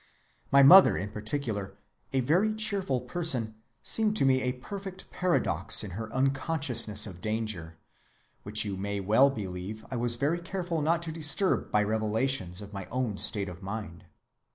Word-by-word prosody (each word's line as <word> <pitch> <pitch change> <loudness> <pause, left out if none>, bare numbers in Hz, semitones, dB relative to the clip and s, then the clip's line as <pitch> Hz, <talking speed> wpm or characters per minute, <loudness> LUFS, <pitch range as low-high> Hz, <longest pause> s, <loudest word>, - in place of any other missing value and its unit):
My 140 0 +6
mother 185 +7 +8
in 100 +2 -5
particular, 110 -3 -4 0.3
a 135 - +1
very 180 - +1
cheerful 200 - 0
person, 130 -11 0 0.3
seemed 215 -1 +2
to 135 - +2
me 130 -1 +3
a 125 -1 -1
perfect 190 +8 -9
paradox 180 -9 +2
in 100 - -7
her 110 +4 -6
unconsciousness 135 -4 0
of 90 -4 -10
danger, 105 -7 -4 0.6
which 105 +2 -1
you 100 -2 -4
may 100 +1 -3
well 110 +8 +4
believe 100 -3 -6
I 130 - -3
was 120 0 +1
very 145 +7 0
careful 175 -2 -4
not 165 +3 +1
to 165 - -4
disturb 160 +4 +1
by 105 - +2
revelations 110 -2 -2
of 100 0 -12
my 100 -2 -6
own 125 -5 -3
state 100 -2 +1
of 90 0 -9
mind. 100 -4 -7
120 Hz, 160 wpm, -28 LUFS, 105-160 Hz, 0.6 s, mother